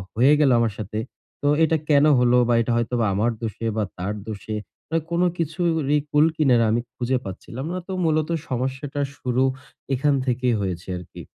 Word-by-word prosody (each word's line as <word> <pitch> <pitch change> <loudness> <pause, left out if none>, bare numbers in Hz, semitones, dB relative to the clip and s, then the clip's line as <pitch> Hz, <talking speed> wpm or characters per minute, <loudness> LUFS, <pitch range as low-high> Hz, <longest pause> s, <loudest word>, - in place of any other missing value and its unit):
হয়ে 130 +6 +5
গেলো 135 -4 +5
আমার 115 -3 +1
সাথে 110 0 -4 0.4
তো 145 - 0 0.2
এটা 160 0 +3
কেন 145 0 +5
হলো? 125 0 +4
বা 120 - +3
এটা 115 - -1
হয়তো 120 +1 -1 0.2
আমার 110 +5 +1
দোষে 115 0 -3
বা 105 - +2
তার 95 +4 -2
দোষে, 110 0 -5 0.3
মানে 165 +1 0
কোন 170 +1 +1 0.2
কিছুরই 160 -3 0
কূলকিনারা 150 -6 +3
আমি 120 +1 +1
খুঁজে 125 +1 0
পাচ্ছিলাম 115 +8 -7
না। 185 - -2
তো - - -6
মূলত 155 0 +1 0.2
সমস্যাটার 135 +3 -2
শুরু 125 0 0 0.5
এখান 140 +2 +2
থেকেই 125 -2 +1
হয়েছে 90 -2 -4
আরকি। 90 - -10
125 Hz, 170 wpm, -23 LUFS, 115-150 Hz, 0.5 s, হয়ে